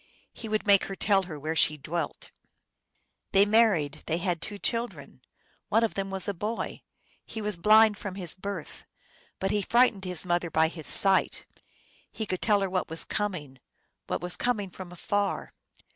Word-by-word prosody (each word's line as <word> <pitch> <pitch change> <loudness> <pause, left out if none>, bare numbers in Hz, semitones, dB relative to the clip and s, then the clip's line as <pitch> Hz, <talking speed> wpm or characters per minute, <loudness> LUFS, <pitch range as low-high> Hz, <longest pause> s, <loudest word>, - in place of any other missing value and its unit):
He 225 - -8
would 215 0 -1
make 200 -2 +5
her 195 - -6
tell 195 0 +2
where 155 -3 -5
she 155 -1 +2
dwelt. 155 +2 -4 1.0
They 195 +1 +6
married; 205 -9 +3
they 165 - 0
had 175 -2 -1
two 205 +2 -5
children. 235 +3 -3 0.5
One 225 - +3
of 225 - 0
them 195 0 -3
was 190 +1 0
a 200 - 0
boy; 210 +5 -4 0.4
He 225 - -7
was 210 -2 -2
blind 215 +3 +5
from 195 -2 -6
his 180 -5 -3
birth, 190 -4 -7 0.6
But 195 - 0
he 205 - +1
frightened 230 -3 +3
his 180 -2 -4
mother 175 -1 0
by 160 0 +3
his 160 -3 -9
sight. 195 -1 +3 0.7
He 220 - -4
could 185 -3 -3
tell 210 -2 +3
her 195 - 0
what 185 -1 -1
was 160 +1 -3
coming, 160 -11 -4 0.5
What - - -2
was 180 0 -2
coming 210 -6 -1
from 180 0 -9
afar. 200 +3 -2
195 Hz, 175 wpm, -28 LUFS, 170-210 Hz, 1.0 s, They